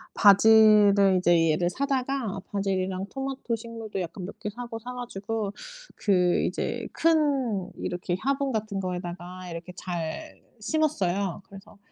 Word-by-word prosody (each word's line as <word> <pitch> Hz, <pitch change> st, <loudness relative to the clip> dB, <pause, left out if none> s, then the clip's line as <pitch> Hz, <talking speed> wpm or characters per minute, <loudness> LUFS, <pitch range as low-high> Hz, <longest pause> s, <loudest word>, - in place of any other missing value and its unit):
바질을 205 Hz, -2 st, +6 dB
이제 170 Hz, -2 st, +4 dB
얘를 175 Hz, +3 st, +1 dB
사다가 260 Hz, -5 st, -2 dB
바질이랑 190 Hz, -1 st, -1 dB
토마토 270 Hz, -3 st, -3 dB
식물도 225 Hz, -3 st, -6 dB
약간 180 Hz, +2 st, -6 dB
몇 195 Hz, -, -9 dB
개 210 Hz, -, -4 dB
사고 235 Hz, +1 st, -7 dB
사 250 Hz, +2 st, -7 dB
가지고 220 Hz, -3 st, -4 dB, 0.4 s
그 180 Hz, -4 st, +2 dB
이제 -, -, -2 dB
큰 275 Hz, -, +1 dB
이렇게 175 Hz, 0 st, -3 dB
화분 275 Hz, 0 st, 0 dB
같은 210 Hz, -2 st, -2 dB
거에다가 180 Hz, 0 st, -5 dB
이렇게 170 Hz, +2 st, -7 dB
잘 175 Hz, -, -5 dB, 0.2 s
심었어요. 200 Hz, -, 0 dB
그래서 195 Hz, +1 st, -13 dB
200 Hz, 280 characters per minute, -26 LUFS, 185-240 Hz, 0.4 s, 바질을